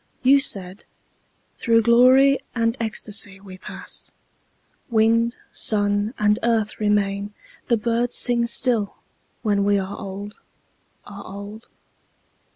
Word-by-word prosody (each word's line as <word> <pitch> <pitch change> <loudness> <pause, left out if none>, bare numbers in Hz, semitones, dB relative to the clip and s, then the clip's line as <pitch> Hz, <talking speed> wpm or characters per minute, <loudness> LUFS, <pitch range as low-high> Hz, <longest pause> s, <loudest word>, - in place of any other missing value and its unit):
You 275 +2 +6
said, 195 -6 -2 0.7
"Through 230 -1 +2
glory 255 +4 +5 0.2
and 230 0 +1
ecstasy 210 -3 -2
we 190 -1 -12
pass; - - -7 0.8
Wind, 230 +1 +2 0.2
sun, 205 +2 0
and 210 +1 +2
earth 225 -2 0
remain, 205 -1 0 0.3
the 235 - +2
birds 235 +2 -1
sing 235 -1 +2
still, 230 -4 +1 0.5
When 205 -3 +1
we 205 0 +2
are 195 +1 -4
old, 200 +1 -8 0.7
are 200 0 -10
old. 200 +3 -10
215 Hz, 110 wpm, -22 LUFS, 205-235 Hz, 0.8 s, You